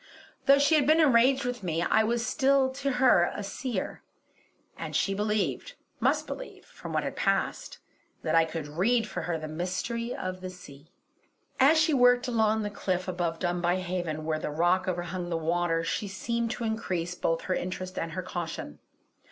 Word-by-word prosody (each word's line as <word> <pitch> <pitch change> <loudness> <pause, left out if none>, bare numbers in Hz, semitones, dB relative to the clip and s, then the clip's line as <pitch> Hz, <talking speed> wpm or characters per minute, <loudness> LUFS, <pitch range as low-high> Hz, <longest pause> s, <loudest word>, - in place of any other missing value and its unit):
Though 275 0 +8
she 285 +3 +3
had 295 -3 +4
been 310 +2 +5
enraged 265 -2 +4
with 245 -2 -3
me, 170 -2 -1
I 220 +4 +3
was 235 +1 0
still 270 -2 +2
to 275 0 -2
her 250 -9 +4
a 205 - -4
Seer; 210 +1 -4 0.7
and - - -6
she 195 - +1
believed 210 - -1 0.2
must - - +2
believe - - -8
from - - -10
what - - 0
had - - -4
passed - - -1 0.5
that - - -1
I 165 0 +5
could 160 -2 -5
read 215 +10 +1
for 195 - -4
her 170 -2 -2
the 155 0 -6
Mystery 185 +9 -3
of 185 0 -5
the 185 - -5
Sea. 160 -4 -14 0.7
As 285 +5 +6
she 315 0 +3
worked 245 -1 +4
along 220 -2 +2
the 205 - -3
cliff 185 -2 -2
above 175 -2 -2
Dunbuy 175 0 0
Haven, 175 -4 -3
where 155 -1 -1
the - - -3
rock 175 +5 +1
overhung 175 0 -3
the 165 - -1
water, 165 0 0
she 205 +5 -2
seemed 230 +4 -2
to 235 - -4
increase 185 -6 -2
both 165 -2 -1
her 185 - -1
interest 185 0 -4
and 165 0 -4
her 185 - -3
caution. 165 - -5
185 Hz, 185 wpm, -28 LUFS, 175-240 Hz, 0.7 s, Though